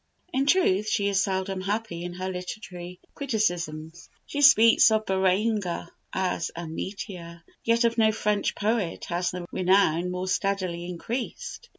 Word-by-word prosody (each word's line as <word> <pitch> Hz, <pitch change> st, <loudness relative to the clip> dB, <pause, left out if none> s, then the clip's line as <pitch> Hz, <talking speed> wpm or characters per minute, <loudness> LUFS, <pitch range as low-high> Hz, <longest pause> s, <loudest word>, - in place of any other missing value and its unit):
In 270 Hz, +1 st, +1 dB
truth, 215 Hz, -, +3 dB
she 200 Hz, -2 st, +1 dB
is 195 Hz, -1 st, +2 dB
seldom 190 Hz, -1 st, -1 dB
happy 200 Hz, -3 st, -3 dB
in 175 Hz, 0 st, -5 dB
her 185 Hz, +1 st, -4 dB
literary 180 Hz, -1 st, -7 dB
criticisms. 175 Hz, -, -2 dB, 0.2 s
She 290 Hz, -, -3 dB
speaks 230 Hz, -5 st, +7 dB
of 220 Hz, 0 st, +1 dB
Béranger 190 Hz, -1 st, 0 dB, 0.2 s
as 185 Hz, -3 st, -1 dB
"a 170 Hz, 0 st, -5 dB
meteor," 170 Hz, 0 st, -7 dB, 0.2 s
yet 230 Hz, +1 st, +3 dB
of 230 Hz, 0 st, +1 dB
no 220 Hz, -1 st, +5 dB
French 210 Hz, -1 st, 0 dB
poet 210 Hz, -4 st, -1 dB
has 175 Hz, +1 st, 0 dB
the 180 Hz, -1 st, -5 dB
renown 180 Hz, -2 st, +3 dB
more 180 Hz, +1 st, -3 dB
steadily 185 Hz, -3 st, -1 dB
increased. 235 Hz, -, -5 dB
190 Hz, 145 wpm, -26 LUFS, 180-220 Hz, 0.2 s, speaks